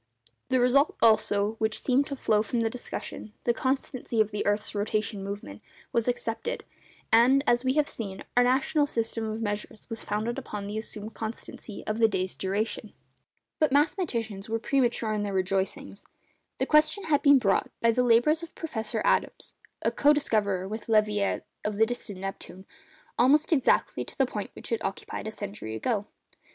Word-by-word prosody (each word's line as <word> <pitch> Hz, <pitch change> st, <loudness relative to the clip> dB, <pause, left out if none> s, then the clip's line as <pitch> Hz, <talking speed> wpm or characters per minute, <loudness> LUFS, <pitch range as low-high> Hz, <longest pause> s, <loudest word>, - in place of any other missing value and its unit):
The 260 Hz, -1 st, +3 dB
result, 260 Hz, +4 st, +4 dB
also, 210 Hz, -2 st, +4 dB
which 220 Hz, -1 st, 0 dB
seemed 270 Hz, +2 st, +2 dB
to 280 Hz, -, -4 dB
flow 215 Hz, -5 st, +2 dB
from 230 Hz, +2 st, -1 dB
the 225 Hz, -1 st, 0 dB
discussion—the 235 Hz, -1 st, -4 dB
constancy 260 Hz, -2 st, -2 dB
of 215 Hz, -1 st, +3 dB
the 210 Hz, -, -2 dB
earth's 205 Hz, +1 st, 0 dB
rotation 205 Hz, -1 st, -1 dB
movement—was 200 Hz, -, -5 dB
accepted; 245 Hz, -, -2 dB, 0.5 s
and, 250 Hz, +5 st, +6 dB
as 240 Hz, -1 st, +3 dB
we 260 Hz, 0 st, +2 dB
have 300 Hz, 0 st, +2 dB
seen, 195 Hz, -4 st, -5 dB
our 245 Hz, -, +6 dB
national 270 Hz, +4 st, +2 dB
system 230 Hz, -2 st, -1 dB
of 220 Hz, +1 st, -3 dB
measures 205 Hz, 0 st, -4 dB
was 225 Hz, -, -3 dB
founded 215 Hz, +3 st, -2 dB
upon 205 Hz, -1 st, -6 dB
the 210 Hz, +2 st, -3 dB
assumed 215 Hz, 0 st, -7 dB
constancy 220 Hz, -1 st, -7 dB
of 215 Hz, +1 st, -2 dB
the 225 Hz, -, +6 dB
day's 190 Hz, -3 st, -2 dB
duration. 205 Hz, +2 st, -2 dB, 0.7 s
But 310 Hz, -3 st, +3 dB
mathematicians 235 Hz, -, 0 dB
were 225 Hz, -, +1 dB
premature 235 Hz, -2 st, +1 dB
in 210 Hz, -, -1 dB
their 200 Hz, -1 st, -2 dB
rejoicings. 190 Hz, +1 st, -1 dB, 0.5 s
The -, -, 0 dB
question 310 Hz, +6 st, +3 dB
has 295 Hz, -3 st, +2 dB
been 285 Hz, -1 st, +7 dB
brought, 200 Hz, -6 st, +2 dB
by 230 Hz, -, +4 dB
the 250 Hz, -, +1 dB
labours 250 Hz, +7 st, +4 dB
of 335 Hz, 0 st, -9 dB
Professor 225 Hz, -10 st, -3 dB
Adams—co 290 Hz, +1 st, +1 dB
discoverer 205 Hz, -9 st, 0 dB
with 220 Hz, +3 st, -6 dB
Leverrier 210 Hz, -2 st, +2 dB, 0.2 s
of 210 Hz, 0 st, -2 dB
the 220 Hz, +2 st, +4 dB
distant 225 Hz, -4 st, -5 dB
Neptune—almost 240 Hz, -, -1 dB
exactly 270 Hz, -5 st, +2 dB
to -, -, -12 dB
the 270 Hz, -, +4 dB
point 210 Hz, -5 st, -5 dB
which -, -, -9 dB
it 230 Hz, -, -1 dB
occupied 195 Hz, +2 st, -4 dB
a -, -, -3 dB
century 200 Hz, -, -6 dB
ago. 210 Hz, -, -1 dB
225 Hz, 165 wpm, -28 LUFS, 205-255 Hz, 0.7 s, been